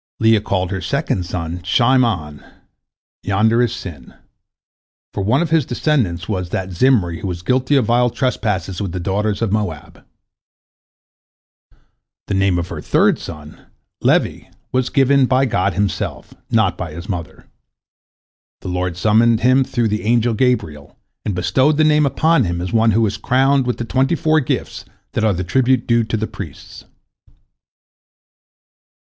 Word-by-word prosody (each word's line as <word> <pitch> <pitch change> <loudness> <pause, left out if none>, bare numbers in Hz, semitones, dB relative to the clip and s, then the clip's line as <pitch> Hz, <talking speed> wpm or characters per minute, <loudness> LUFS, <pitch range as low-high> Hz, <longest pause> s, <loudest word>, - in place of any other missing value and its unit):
" - - -77
Leah 110 -2 +4
called 95 -2 -2
her 95 -1 -3
second 90 0 -2
son 85 -1 -4
Shime'on, 105 - +1 0.8
"Yonder 110 +4 +2
is 120 -2 +1
sin," 85 - -9 1.0
for - - -3
one 115 - +2
of 165 - -5
his 160 -2 +3
descendants 120 - -1
was 90 -4 -3
that 95 +1 -3
Zimri 90 -5 +2
who - - -5
was 90 -1 -5
guilty 130 +7 +1
of 130 -5 +3
vile 120 +2 +2
trespasses 105 -8 -2
with 95 -4 -4
the 90 - -3
daughters 100 +4 -1
of 110 - -1
Moab. 105 0 -4 2.2
The - - -4
name 95 -2 +2
of 85 -1 -3
her - - -6
third - - +2
son, 75 -2 -10 0.3
Levi, - - +1 0.3
was 130 -1 0
given 140 +1 +3
him 130 - +5
by 130 +1 +2
God 100 -6 0
Himself, 100 0 -3 0.2
not 110 -4 +2
by 85 -4 -5
his 85 +4 -8
mother. 90 -7 -6 1.2
The - - -6
Lord 90 -1 -2
summoned 110 +3 +3
him 130 +2 +4
through 120 -3 -1
the 105 +1 -2
angel 115 +1 +1
Gabriel, 105 - -1 0.3
and 100 - -3
bestowed 130 - +2
the 155 - +4
name 150 -1 +4
upon 155 -1 +2
him 85 -1 -2
as 90 +1 -5
one 115 0 +3
who 110 +1 +3
is 105 - -2
"crowned" 135 +1 +2
with 125 - -1
the 120 - -4
twenty 135 +7 +1
four 155 -1 +2
gifts 130 - -3 0.3
that - - -2
are 110 -2 +3
the 90 +1 -3
tribute 130 +6 +1
due 115 -1 +2
to 110 0 -2
the 110 - -2
priests. 90 -9 -10
110 Hz, 160 wpm, -18 LUFS, 90-125 Hz, 2.2 s, him